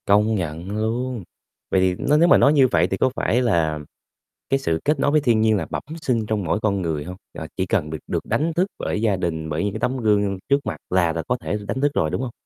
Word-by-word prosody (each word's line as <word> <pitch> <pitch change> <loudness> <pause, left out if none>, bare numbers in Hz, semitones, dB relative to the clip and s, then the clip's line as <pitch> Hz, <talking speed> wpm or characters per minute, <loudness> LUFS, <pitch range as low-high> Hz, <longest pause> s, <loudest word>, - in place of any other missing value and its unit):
Công 105 +2 +4
nhận 85 -1 -4
luôn. 120 +1 -2 0.5
Vậy 95 - +3
thì 95 -1 +2 0.2
nếu 170 - +5
mà - - +7
nói 140 - +5
như 135 -3 +5
vậy 85 -6 +2
thì 95 - 0
có 130 - +2
phải 125 -1 +1
là 80 -10 +1 0.7
cái 135 - +2
sự 80 -11 -1
kết 150 -1 +2
nối 140 - +2
với 155 0 +3
thiên 115 -5 +2
nhiên 110 -1 +3
là - - -3
bẩm - - -4 0.2
sinh 115 -6 0
trong 105 -1 -1
mỗi 100 - 0
con 100 -3 0
người 80 -4 -2
hông? 90 +4 -7 0.2
Ờ, 80 - -6
chỉ 95 - 0
cần 90 -7 0
được 80 0 -5
được - - -2
đánh 160 +2 0
thức 180 +4 +1
bởi 105 - -2
gia 110 -3 +2
đình, 80 -4 -3
bởi 75 +1 -1
những 100 -1 -1
cái 110 - -4
tấm 125 +4 -1
gương 105 -4 +1
trước 140 0 +4
mặt - - -3
là 90 -3 +2
là 80 0 -3
có 125 - 0
thể 105 - -2
đánh 130 - -2
thức 145 0 +2
rồi, 80 - +1
đúng - - -2
hông? 130 -2 -4
105 Hz, 265 wpm, -22 LUFS, 85-125 Hz, 0.7 s, mà